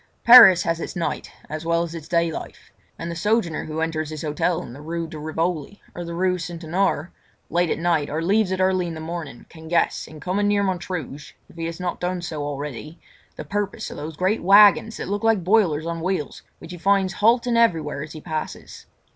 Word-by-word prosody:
Paris 230 -7 +9
has 165 0 -1
its - - -6
night 170 -2 -3 0.2
as 155 +1 -6
well 170 0 +1
as 170 -1 -6
its 160 -2 -8
day 170 -1 +1
life, - - -9 0.3
and 170 +1 -5
the - - -5
sojourner 205 -3 0
who 155 +1 -4
enters 160 -1 -2
his 155 0 -6
hotel 160 +3 -1
in 120 - -10
the 140 - -11
Rue 165 +2 -4
de 160 -1 -9
Rivoli 160 +4 -3
or 175 - -6
the 170 0 -6
Rue 180 +1 +1
St. 170 0 -7
Honore 170 -1 0 0.4
late 175 0 +1
at - - 0
night 165 -3 0
or 155 - -2
leaves 195 +4 +1
it 190 - -1
early 185 -1 +2
in 165 - -5
the - - -7
morning, 160 -5 -7
can 160 -1 -13
guess, 170 +1 0
in 155 - -12
coming 195 +5 -1
near 205 0 +2
Montrouge—if 175 -8 -5
he 165 -1 -4
has 165 +1 -6
not 180 -1 -3
done 180 0 -3
so 155 -3 -4
already—the 145 +2 -8
purpose 205 +2 -3
of - - -8
those 155 +1 -7
great 190 +4 0
waggons 205 +4 +6
that - - -5
look 205 +3 -3
like 225 -5 +2
boilers 175 -6 +2
on 170 0 -4
wheels 180 -5 -3 0.2
which 165 - -11
he 175 - -8
finds 195 +1 +2
halting 235 +2 +3
everywhere 165 -11 +1
as 155 +1 -7
he 155 - -9
passes. 155 0 -6
170 Hz, 215 wpm, -23 LUFS, 160-190 Hz, 0.4 s, Paris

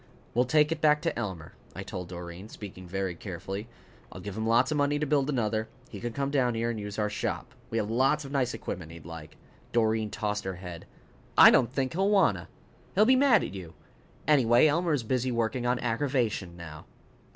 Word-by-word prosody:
"We'll 125 +2 +3
take 150 +4 +3
it 160 -1 -2
back 150 -1 +4
to - - 0
Elmer," 95 -9 -5 0.2
I - - -5
told 90 -1 -6
Doreen, 90 +3 -8
speaking 95 -4 -9
very 95 0 -2
carefully. 95 +4 -6 0.4
"I'll - - -9
give 100 -2 -7
him 110 0 -2
lots 120 +5 +3
of 155 - +1
money 145 0 +2
to 150 - -1
build 145 -1 +1
another. 110 -4 0 0.2
He - - -7
can 120 0 -4
come 140 +3 -2
down 125 -4 +2
here 115 +1 0
and 110 - -5
use 105 -1 -6
our 105 -1 +1
shop. 105 - -4 0.2
We 115 - -2
have 110 -1 -1
lots 135 +5 +2
of 135 - -8
nice 130 -3 0
equipment 85 -3 -6
he'd 85 -1 -12
like." 80 -2 -10 0.4
Doreen 110 -2 +2
tossed 105 -1 -2
her 95 -1 -4
head. 90 -2 -9 0.5
"I - - +10
don't 125 -2 +3
think 130 -1 -1
he'll 195 +4 +1
wanta. 165 - +3 0.5
He'll 210 +3 +6
be 260 +3 +6
mad 255 -4 +5
at - - -5
you. 90 -4 -9 0.5
Anyway, 125 -4 +5
Elmer 165 +2 +2
is 140 -5 0
busy 125 +2 0
working 120 +1 -1
on 125 +1 +2
aggravation 115 -7 -1
now." 80 -2 -10
115 Hz, 205 wpm, -28 LUFS, 95-140 Hz, 0.5 s, I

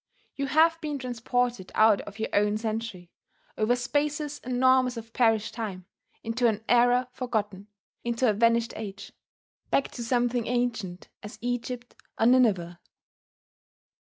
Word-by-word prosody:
You 275 0 -3
have 325 +3 +3
been 300 -2 -3
transported 245 -4 -2
out 215 -2 +5
of 205 0 -11
your 220 - -2
own 210 +1 +2
century 220 -5 -4 0.4
over 220 +3 +2
spaces 295 +4 -1
enormous 255 0 +3
of 230 0 -9
perished 225 -3 +2
time 200 -6 -5 0.4
into 235 +2 +1
an 220 -1 -1
era 245 +1 +4
forgotten, 210 -6 -3 0.4
into 235 +1 0
a 215 - +4
vanished 230 +2 +2
age, 200 -2 -7 0.6
back 275 - +1
to 240 - -6
something 240 0 0
ancient 225 -7 -2
as 210 - -9
Egypt 245 0 -4 0.3
or 225 - +3
Nineveh. 205 -9 +3
235 Hz, 130 wpm, -27 LUFS, 215-250 Hz, 0.6 s, out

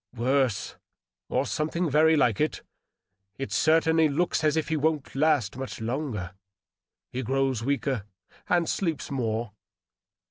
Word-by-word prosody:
" 105 - -27
Worse, 125 -2 0 0.5
or - - +1
something 165 +3 -1
very 155 +2 +4
like 120 -7 +2
it. 155 - -1 0.7
It 135 - -5
certainly 160 0 +3
looks 165 +2 0
as 155 0 +2
if 160 - -1
he 160 - +1
wouldn't 155 -1 0
last 140 -7 +1
much 135 0 -6
longer. 115 - -3 0.8
He 130 - -3
grows 135 -1 0
weaker, 135 -4 -1 0.4
and 170 -2 +2
sleeps 165 -8 -2
more." 115 -4 -2
140 Hz, 135 wpm, -27 LUFS, 125-155 Hz, 0.8 s, very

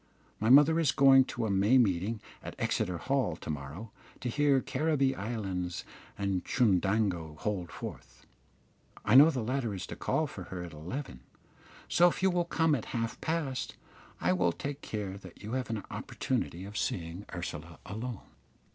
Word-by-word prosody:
My 110 - +1
mother 145 +5 +7
is 155 -4 +3
going 135 -2 +7
to 120 -3 -3
a 105 - 0
May 100 +6 +4
meeting 105 -1 +1 0.2
at - - -7
Exeter 90 -1 0
Hall 130 - 0
to 80 - -9
morrow 75 +9 -7 0.3
to 125 - -2
hear 145 +1 +3
Caribbee 140 -1 +1
Islands 95 -6 -3 0.3
and 100 -2 -1
Chundango 95 - +1
hold 95 -2 -3
forth. - - -9 0.8
I 105 - +3
know 140 +5 +10
the 130 -7 -2
latter 120 -3 -1
is 95 - -5
to - - -7
call - - 0
for - - -8
her 90 -2 -6
at 85 -3 -8
eleven, 80 - -6 0.7
so 175 - +5
if 180 - -5
you 190 - +5
will 175 -1 +1
come 165 -2 +2
at 125 -7 -1
half 115 0 -3
past, 155 -6 -2 0.4
I 90 +2 +2
will 90 -1 +2
take 140 +1 -5
care 100 -3 -4
that 95 0 -13
you 105 - -6
have 130 -1 -2
an 110 -3 -3
opportunity 85 +6 -3
of 105 +1 -5
seeing 85 +3 -3
Ursula 85 -2 -6
alone." 115 +2 -5
110 Hz, 170 wpm, -31 LUFS, 90-135 Hz, 0.8 s, know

